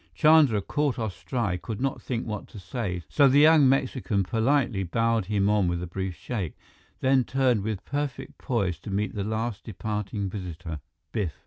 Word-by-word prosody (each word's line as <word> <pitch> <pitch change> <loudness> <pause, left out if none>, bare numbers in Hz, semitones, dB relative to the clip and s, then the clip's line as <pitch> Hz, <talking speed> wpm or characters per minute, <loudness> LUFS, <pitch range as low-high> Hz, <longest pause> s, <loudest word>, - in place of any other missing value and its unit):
Chandra, 145 - +5
caught 145 +1 0
off 110 -6 -3
stride, 90 +1 -2
could 110 -3 -5
not 135 +1 -1
think 120 -2 -3
what 105 -2 -5
to - - -13
say, 90 -1 -4
so 140 - +5
the 135 +1 +4
young 150 -2 +7
Mexican 130 -7 +1
politely 115 +1 +1
bowed 115 +3 +1
him 100 0 +1
on 105 -3 +3
with 85 0 -1
a - - -2
brief 95 +1 -4
shake; 95 - -4 0.4
then 130 -1 +4
turned 130 -4 +1
with 105 -1 -4
perfect 140 -2 -4
poise 95 -10 -1
to 105 - -9
meet 100 +2 -1
the 100 - -2
last 110 +1 -3
departing 105 -1 -3
visitor, 85 -5 -6 0.3
Biff. 95 -7 -2
110 Hz, 180 wpm, -26 LUFS, 95-130 Hz, 0.4 s, young